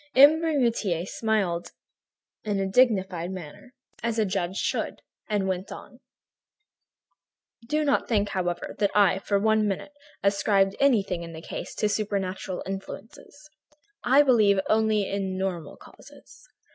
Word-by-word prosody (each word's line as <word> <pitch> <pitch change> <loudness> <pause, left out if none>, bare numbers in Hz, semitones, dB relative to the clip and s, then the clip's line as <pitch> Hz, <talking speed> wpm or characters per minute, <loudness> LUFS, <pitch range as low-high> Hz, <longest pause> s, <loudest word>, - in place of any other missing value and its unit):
M. 290 +4 +7
Bermutier 235 - 0
smiled 195 -7 -1 0.7
in 205 -2 -1
a 195 - 0
dignified 190 -5 +2
manner, 185 - -9 0.3
as 230 -1 -2
a 220 - +2
judge 185 -1 -2
should, - - -2 0.3
and 205 -2 0
went 190 +1 -3
on: - - -11 1.7
"Do 305 +3 0
not 285 - +1
think, 205 -3 +1
however, 175 -3 -3
that 205 -2 +3
I, 195 -2 +4
for 200 +1 0
one 220 +1 +2
minute, 200 +8 -4 0.3
ascribed 200 -1 +2
anything 205 -10 +2
in 165 -1 -8
the 160 - -8
case - - -7
to 210 - +1
supernatural 195 -3 -3
influences. 195 +9 -9 0.6
I 270 +4 +5
believe 215 -7 +4
only 215 -2 +2
in 195 -1 -3
normal 180 -5 -4
causes. - - -17
200 Hz, 135 wpm, -26 LUFS, 190-220 Hz, 1.7 s, M